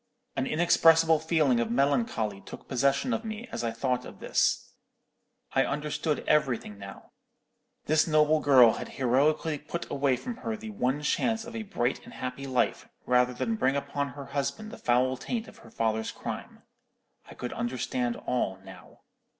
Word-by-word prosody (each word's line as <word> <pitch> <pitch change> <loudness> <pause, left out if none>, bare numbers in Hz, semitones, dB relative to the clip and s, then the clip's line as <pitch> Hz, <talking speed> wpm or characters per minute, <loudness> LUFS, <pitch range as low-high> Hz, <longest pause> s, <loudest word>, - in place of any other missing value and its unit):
An 135 - -1
inexpressible 165 -1 +5
feeling 155 -6 +2
of 115 -1 0
melancholy 120 - 0
took - - -11
possession 140 - +1
of 225 0 -2
me 220 +2 -6
as 120 - -4
I 115 - 0
thought 125 +2 -1
of - - -11
this. - - 0 0.8
I - - +4
understood 150 +1 -2
everything 130 -9 +1
now. 100 0 -11 0.7
This 155 +2 +3
noble 155 0 +4
girl 130 -6 +7
had - - -6
heroically 145 +4 +2
put 170 - -5
away 135 -2 +2
from 240 - -6
her 225 -3 -4
the 220 0 -8
one 145 -6 -1
chance 225 +8 0
of 235 - -9 0.2
bright 120 -6 -1
and - - -12
happy 130 +2 -5
life, 130 -2 0 0.2
rather 125 0 +3
than 225 - -1
bring 135 -8 +2
upon 140 0 -2
her 140 +1 -8
husband 215 +10 -2
the 235 - -9
foul 125 +2 +2
taint 230 - -4
of - - -14
her 115 - -15
father's 110 0 -1
crime. - - -7 0.6
I - - -12
could 125 - -5
understand 120 0 -2
all 100 -7 -2
now. - - -14
140 Hz, 165 wpm, -28 LUFS, 125-160 Hz, 0.8 s, girl